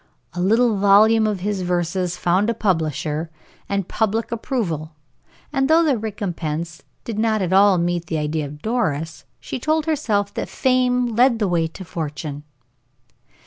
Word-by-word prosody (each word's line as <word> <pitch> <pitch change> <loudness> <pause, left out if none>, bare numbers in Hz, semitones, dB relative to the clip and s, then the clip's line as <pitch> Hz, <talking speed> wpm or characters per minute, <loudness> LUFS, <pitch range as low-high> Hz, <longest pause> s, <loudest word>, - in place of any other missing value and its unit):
A 175 - -3
little 225 +3 +3
volume 215 +3 +5
of 205 -4 -2
his 200 0 -2
verses 180 0 -1
found 185 +5 +1
a 230 - 0
publisher, 160 -5 -1 0.4
and 200 -2 -1
public 225 +1 -1
approval, 175 - -3 0.6
and 270 0 +1
though 325 +1 +5
the 295 -5 +2
recompense 170 -7 -4 0.2
did 220 -2 -4
not 220 -2 +1
at 185 0 -1
all 195 0 +6
meet 170 -1 -1
the 160 - -2
idea 150 0 -1
of 150 +1 -12
Doris, 165 - -2
yet - - -44
she - - -5
told 310 +3 0
herself 215 -11 0
that - - -4
fame 250 -2 +1
led 245 0 +4
the 210 -3 0
way 170 -2 +1
to 185 +3 -10
fortune. 150 -3 -5
195 Hz, 160 wpm, -21 LUFS, 165-225 Hz, 0.6 s, all